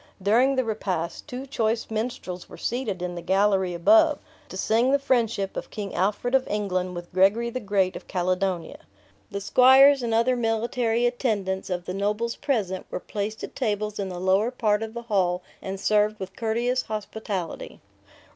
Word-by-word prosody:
During 235 +8 +3
the 260 - +2
repast, 190 -7 -3
two 255 +2 -6
choice 230 -4 -1
minstrels 220 -5 -4
were - - -11
seated 225 -7 -3
in 180 0 -3
the 175 - -6
gallery 190 0 +2
above, 315 - +5 0.3
to - - -7
sing 230 +4 +2
the 280 - +4
friendship 230 -7 0
of - - -5
King 205 -3 -6
Alfred 210 +6 0
of 265 -1 +3
England 185 -3 -2
with 175 +1 -8
Gregory 205 +6 +3
the 255 - -3
Great 195 -4 0
of - - -9
Caledonia. 185 -1 -1 0.5
The 200 - -4
squires 265 +6 +6
and 235 -1 -2
other 230 +3 +3
military 230 0 0
attendants 210 -7 -1
of 180 -1 -3
the 180 - -4
nobles 210 +4 -1
present, 210 -10 -2
were - - -4
placed 210 +3 -5
at - - -7
tables 210 -4 -2
in 195 -1 -2
the 180 - -6
lower 190 +5 +2
part 215 -4 +1
of 225 +1 -5
the 235 - -5
hall, 185 -5 0 0.2
and 195 0 -5
served 210 +1 +2
with 190 0 -7
courteous 235 +3 0
hospitality. 210 -5 -5
210 Hz, 175 wpm, -25 LUFS, 190-235 Hz, 0.5 s, squires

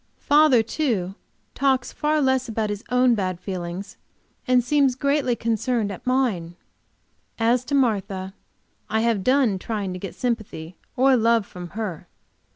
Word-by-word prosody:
Father, 290 -5 +4
too, 220 - -1 0.4
talks 265 -2 +1
far 305 +1 +1
less 260 -2 +1
about 220 -1 -1
his 205 0 -5
own 250 0 +4
bad 185 -5 -2
feelings, 180 0 -6 0.5
and 250 -1 +4
seems 275 0 +2
greatly 280 -2 +1
concerned 230 -1 -1
at 195 - -9
mine. 220 -11 0 0.8
As 235 +2 +2
to 285 - -1
Martha 195 -7 0 0.6
I 220 +1 +1
have 225 -4 +1
done 255 -6 +2
trying 205 -3 -3
to 180 - -6
get 195 0 -7
sympathy 215 -9 -4 0.2
or 265 +1 +4
love 230 -2 +3
from 180 -2 -9
her. 195 -8 -4
230 Hz, 145 wpm, -23 LUFS, 195-255 Hz, 0.8 s, Father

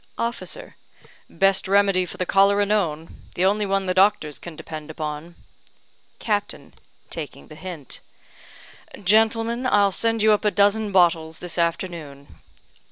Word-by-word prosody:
Officer: 240 - -5 0.5
"Best 195 0 +2
remedy 195 -2 +3
for - - -8
the 185 - -1
cholera 200 +2 +3
known. 170 -7 -2
The 180 - +1
only 205 +1 +1
one 195 0 0
the 185 - 0
doctors 185 -6 +2
can 170 -2 -9
depend 155 0 -8
upon." 155 +2 -6 0.8
Captain 205 -2 -3 0.4
(taking 155 -3 -6
the - - -11
hint): 165 -5 -8 1.0
"Gentlemen, 225 +4 +2
I'll 205 -4 +3
send 225 +2 0
you 215 - +5
up 210 - +2
a 210 - +3
dozen 205 +1 +2
bottles 165 -4 +2
this 175 0 -4
afternoon." 165 -4 -4
195 Hz, 135 wpm, -23 LUFS, 165-205 Hz, 1.0 s, you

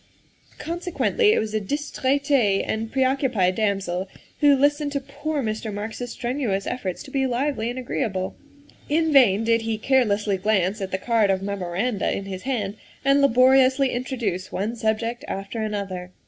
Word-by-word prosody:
' - - -36
' - - -33
Consequently 355 +6 +1
it - - +3
was 215 0 -2
a 215 - 0
distraite 275 -3 +1
and 220 +1 -3
preoccupied 260 -8 +2
dam 200 -1 +1
sel 185 0 -3 0.3
who 290 -1 +6
listened 290 +2 +1
to 280 - 0
poor 285 +2 -4
Mr. 220 0 -3
Marks 210 +2 -5
's 245 - -4
strenuous 240 -5 -2
efforts 195 -8 -4
to 275 - -12
be 270 -1 +1
lively 250 -2 -1
and 245 - -5
agreeable. 195 -6 -2 0.5
In 320 +1 +2
vain 225 -6 +5
did 230 0 +2
he 225 -1 -2
carelessly 215 -5 +2
glance 200 0 +1
at 190 - -3
the 190 - -1
card 225 0 +2
of 190 0 +1
memoranda 200 +3 -1
in 195 - -3
his 190 -1 -6
hand 210 -5 -2 0.3
and 275 +1 +4
laboriously 260 +1 +5
introduce 235 -7 -3
one 215 +5 -2
subject 230 +1 -1
after 195 +4 -4
another. 200 -4 -4
230 Hz, 170 wpm, -24 LUFS, 200-270 Hz, 0.5 s, who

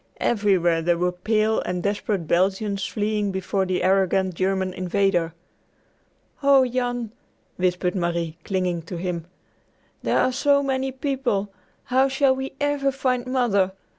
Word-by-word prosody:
Everywhere 185 -7 +2
there 170 +1 +1
were 180 +1 +1
pale 215 +4 +1
and 180 -1 -3
desperate 200 -3 -1
Belgians 195 +3 +1
fleeing 210 -1 -1
before 190 0 -1
the 185 -1 -1
arrogant 190 0 +2
German 190 +1 -1
invader. 185 -2 +1 1.1
"Oh, 275 -2 +5
Jan," 245 -2 -2 0.5
whispered 180 0 0
Marie 170 -2 -2
clinging 180 -3 -1
to 175 - -5
him, 170 -1 -4 0.7
"there - - +1
are 255 - +3
so 280 +2 +3
many 265 -1 -1
people! 255 -7 -2 0.3
How 260 +2 +3
shall 270 0 +2
we 265 +1 -5
ever 290 -1 +1
find 255 -2 -1
Mother? 215 -7 +1
200 Hz, 135 wpm, -23 LUFS, 180-255 Hz, 1.1 s, Oh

